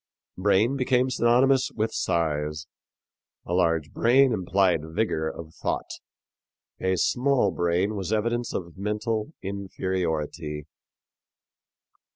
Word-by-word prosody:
Brain 105 +7 +2
became 130 0 +2
synonymous 130 +2 +3
with 110 0 -2
mind. 75 -2 0 0.9
A 85 - -4
large 80 -4 +1
brain 130 +2 +4
implied 95 -3 +2
vigor 80 -1 -1
of 80 0 -9
thought; - - -3 0.9
a 95 0 +1
small 125 +1 +2
brain 85 +5 0
was 95 -1 -4
evidence 115 +2 0
of 85 0 -6
mental 105 +5 -2
inferiority. 85 -6 -3
95 Hz, 100 wpm, -26 LUFS, 85-115 Hz, 0.9 s, brain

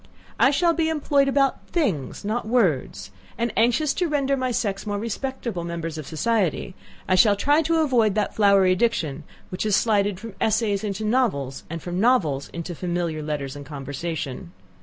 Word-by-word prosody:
I - - +6
shall 335 +4 +2
be 325 -1 0
employed 285 -3 +2
about 275 -1 +1
things, 200 - -2
not 215 +2 -2
words! 200 - 0 0.3
and, 235 -2 -1
anxious 245 +6 +2
to 360 - 0
render 280 -3 +1
my 255 -1 -1
sex 210 -4 -2
more 205 0 -1
respectable 230 -3 -4
members 165 -1 -4
of 155 -3 -7
society, 190 +1 0 0.3
I - - +2
shall 205 +2 +5
try 290 +9 +3
to 325 +1 +1
avoid 235 -9 +2
that 210 -1 0
flowery 200 -3 +4
diction 180 -10 -1 0.2
which 185 - -5
has 210 -2 +2
slided 205 -4 +1
from 225 0 -8
essays 215 -2 +1
into 210 0 -3
novels, 210 - 0
and 165 0 -6
from 175 0 -3
novels 175 - +2
into 170 +1 -6
familiar 170 -2 -2
letters 145 -2 -4
and 145 - -8
conversation. 140 - -5
205 Hz, 170 wpm, -24 LUFS, 170-250 Hz, 0.3 s, I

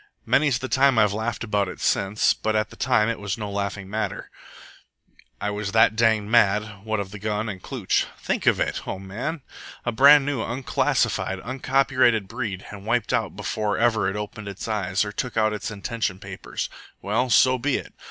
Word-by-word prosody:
Many's 140 -4 +3
the 130 +1 -5
time 135 -1 +3
I've 105 -2 +4
laughed 110 +3 -3
about 105 -3 0
it 90 - -8
since, 100 +2 +2
but 110 0 -2
at 110 0 0
the - - -12
time 115 -5 +2
it 115 - -2
was 100 -2 -3
no 105 -2 -5
laughing 100 -1 -3
matter, 110 +3 -4 1.1
I 105 - -2
was 105 0 -4
that 110 -1 +5
danged 110 -2 +2
mad, 105 -2 +2
what 110 -1 -1
of 100 -1 -5
the 105 - -8
gun 105 +1 -2
and 95 -3 -6
Klooch. - - 0
Think - - -2
of - - +4
it, - - -2
O 95 - -3
man! 115 - -5 0.4
A 120 - +1
brand 140 +4 +7
new, 140 -4 -1
unclassified, 120 -5 0
uncopyrighted 130 -3 +2
breed, 110 -4 -5
and 105 0 -10
wiped 120 +1 0
out 115 -6 0
before 105 +1 -2
ever 110 -4 +2
it 95 - -5
opened 105 0 -6
its 100 +2 -6
eyes 95 -3 0
or 105 - -5
took 120 +3 -4
out 110 -1 +3
its 105 - -4
intention 105 -1 -3
papers! - - -6 0.4
Well, 115 +6 0
so 130 +1 +5
be 140 +2 +1
it. - - -9
110 Hz, 190 wpm, -24 LUFS, 100-120 Hz, 1.1 s, brand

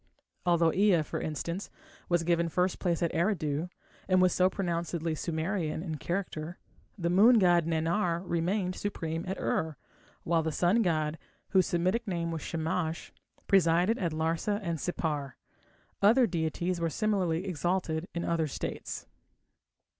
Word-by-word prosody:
Although 170 -2 +4
Ea, 195 -5 +4
for - - -4
instance, 170 +5 -4 0.4
was 175 -1 +2
given 170 0 +1
first 180 +3 0
place 170 -2 0
at 170 - 0
Eridu, 165 -3 0 0.4
and 185 -1 +4
was 185 -1 +4
so 185 0 +4
pronouncedly 170 -3 -2
Sumerian 160 0 -2
in 160 -4 -4
character, 175 0 -4 0.4
the 170 -2 -1
moon 220 +7 +7
god 175 -4 +4
Nannar 170 +2 0
remained 180 +2 0
supreme 165 -5 -3
at 190 - -3
Ur, 160 -3 -1 0.5
while 165 0 +2
the 160 0 -2
sun 180 +9 +3
god, 155 -4 0 0.3
whose 190 -2 +3
Semitic 185 +7 0
name 170 -3 -2
was 165 -2 -4
Shamash, 160 +1 -3 0.3
presided 180 +4 +3
at 170 -4 0
Larsa 165 +6 0
and 170 -3 -2
Sippar. 150 -6 -2 0.7
Other 230 +6 +6
deities 170 -1 -1
were 165 - +1
similarly 185 -2 0
exalted 175 -1 -1
in 170 - -2
other 165 -2 +1
states. 140 - -5
170 Hz, 140 wpm, -30 LUFS, 160-185 Hz, 0.7 s, moon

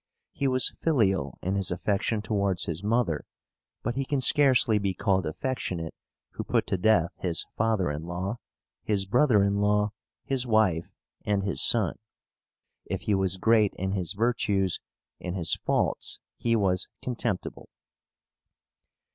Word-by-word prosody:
He 140 - -1
was 130 -1 +3
filial 95 - +1
in 95 - -1
his 100 -1 +2
affection 105 +4 -1
towards 100 -4 0
his 85 +3 -4
mother; 105 -8 +1 0.6
but 120 - -1
he 135 +2 -1
can 140 +1 -1
scarcely 130 -5 +4
be 100 -2 -1
called 95 -1 +1
affectionate 85 -3 -3 0.4
who - - -5
put - - 0
to 95 - -1
death 90 -4 +3
his 85 -3 0
father 110 -7 +1
in 75 +1 -4
law, 90 +6 -3 0.4
his 100 -2 0
brother 115 0 +4
in 100 0 +1
law, 105 0 +2 0.3
his 130 -2 -1
wife, 105 -7 +2 0.4
and 100 -1 0
his 100 - 0
son. 110 -7 +2 0.9
If - - -3
he 105 - 0
was 95 -1 +1
great 110 0 +3
in 95 +1 -2
his 90 -3 -1
virtues, 105 -4 0 0.4
in 90 0 -5
his 85 -4 +1
faults - - 0 0.2
he 115 -1 0
was 95 -3 +1 0.2
contemptible. 120 -6 -3
100 Hz, 145 wpm, -27 LUFS, 90-115 Hz, 0.9 s, scarcely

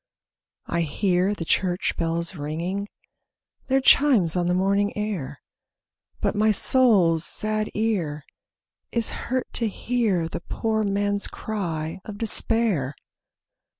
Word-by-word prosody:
I 170 - -2
hear 180 +4 0
the 165 - -6
church 180 +2 -1
bells 170 +1 -2
ringing 170 +6 -4 0.8
Their 270 0 +1
chimes 250 - +4
on 175 -1 0
the 180 - +1
morning 200 +2 0
air; 175 -10 -5 0.8
But - - 0
my 215 +1 +1
soul's 200 -8 +4
sad 215 +2 -1
ear 180 -10 -2 0.7
is 230 -2 -1
hurt 255 0 -3
to 230 - +2
hear 210 -6 -1
The 165 - -7
poor 220 +3 -2
man's 205 0 0
cry 165 -7 -5
of 205 -2 -9
despair. 215 - +4
200 Hz, 115 wpm, -23 LUFS, 170-215 Hz, 0.8 s, chimes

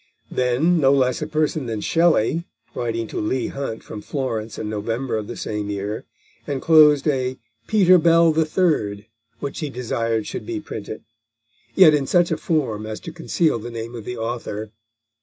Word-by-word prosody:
Then, 130 +8 +2
no 135 -2 +4
less 130 -2 +2
a 150 - -2
person 155 -3 -1
than 110 -2 -3
Shelley, 165 +2 +2 0.3
writing 115 -1 -2
to - - -4
Leigh 125 +4 -1
Hunt 135 -5 -5
from 105 - -8
Florence 115 -6 -4
in - - -4
November 115 +4 -2
of 105 -1 -3
the - - -6
same 105 -1 -3
year, 100 +1 -4 0.4
enclosed 150 +1 +5
a 130 -3 0 0.3
Peter 185 -4 +5
Bell 165 0 +5
the 160 +1 +2
Third 150 - 0 0.4
which 140 - -4
he 150 - -3
desired 115 -3 -2
should - - -6
be 345 -2 -3
printed, 110 - -7 0.7
yet 180 -5 +8
in 140 -2 +1
such 175 -1 +3
a 160 - +1
form 130 -11 -1
as 110 0 -5
to 165 - -8
conceal 165 -5 0
the 120 - -7
name 115 0 -6
of 115 -2 -7
the 125 - -5
author. 115 -2 -4
130 Hz, 175 wpm, -22 LUFS, 110-155 Hz, 0.7 s, yet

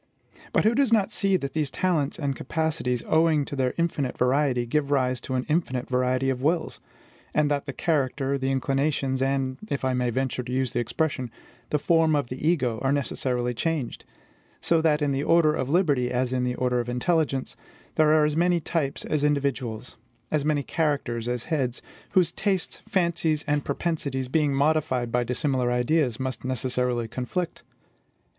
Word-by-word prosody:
But - - +2
who 220 - +4
does 265 -1 +2
not 220 -2 +3
see 195 -2 +2
that 140 -5 -5
these 155 -3 0
talents 160 -4 0
and 140 -3 -2
capacities, 135 -5 -1
owing 155 -2 +3
to 145 - -6
their 130 -2 0
infinite 155 -6 -1
variety, 125 -1 +2
give 140 +4 0
rise 130 -3 +1
to 130 - -4
an 125 - -1
infinite 150 -6 -1
variety 130 +1 +1
of 130 -1 -4
wills, 160 +4 0 0.6
and 150 -1 +2
that 145 -1 -1
the - - -2
character, 140 -3 0
the 135 0 -1
inclinations, 135 0 0
and 135 -1 0
if 140 -1 -2
I 130 - +1
may 125 -1 0
venture 130 +1 -1
to 125 0 -7
use 130 0 0
the 120 - 0
expression 130 +1 -1 0.4
the 150 - +2
form 160 +1 +3
of 140 -5 -1
the 130 +5 -1
ego, 125 -10 +1
are 135 - +1
necessarily 125 -3 -1
changed; 150 0 -2 0.6
so 165 -1 +2
that 155 -2 +2
in 145 - +1
the 135 0 0
order 155 0 +4
of 130 -3 -2
liberty, 145 -7 +2
as 125 0 -1
in 125 -1 0
the 125 0 -1
order 125 -1 0
of 120 0 -3
intelligence, 140 +1 0 0.4
there 155 -1 +4
are 155 -1 +5
as 150 0 0
many 175 +1 +3
types 150 -4 -2
as 150 -2 -1
individuals, 135 -6 -1 0.3
as 150 -2 +1
many 150 -1 +1
characters 140 -8 -1
as 120 -1 -2
heads, 135 -7 -1 0.3
whose 180 -4 +4
tastes, 190 -3 -1
fancies, 170 -4 +1
and 145 -1 +1
propensities, 140 -4 -2
being 150 0 +2
modified 140 -4 +1
by 125 +1 +2
dissimilar 125 0 0
ideas, 125 0 +1
must 130 -1 -3
necessarily 125 -1 -1
conflict? 130 +10 -4
140 Hz, 180 wpm, -26 LUFS, 125-155 Hz, 0.6 s, are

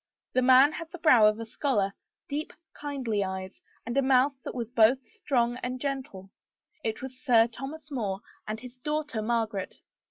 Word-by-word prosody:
The 255 - +3
man 260 +3 +7
had 325 +1 -7
the 355 - -7
brow 250 -10 +6
of 215 +1 +1
a 230 - -4
scholar, 220 -5 0 0.3
deep, 295 +2 -4 0.2
kindly 260 -8 -2
eyes, 190 0 -6 0.2
and 235 +2 -4
a 275 - +4
mouth 265 +1 +4
that - - -7
was 235 -2 -4
both 230 +2 +5
strong 250 - -1
and 255 0 -4
gentle. 255 -9 -4 0.5
It 220 +2 -3
was 260 -1 -7
Sir 235 -4 +5
Thomas 275 +6 -8
More 205 -7 -2 0.3
and 215 +1 -3
his 250 +1 -11
daughter 300 -4 -2
Margaret. 220 -3 -2
250 Hz, 170 wpm, -28 LUFS, 220-275 Hz, 0.5 s, man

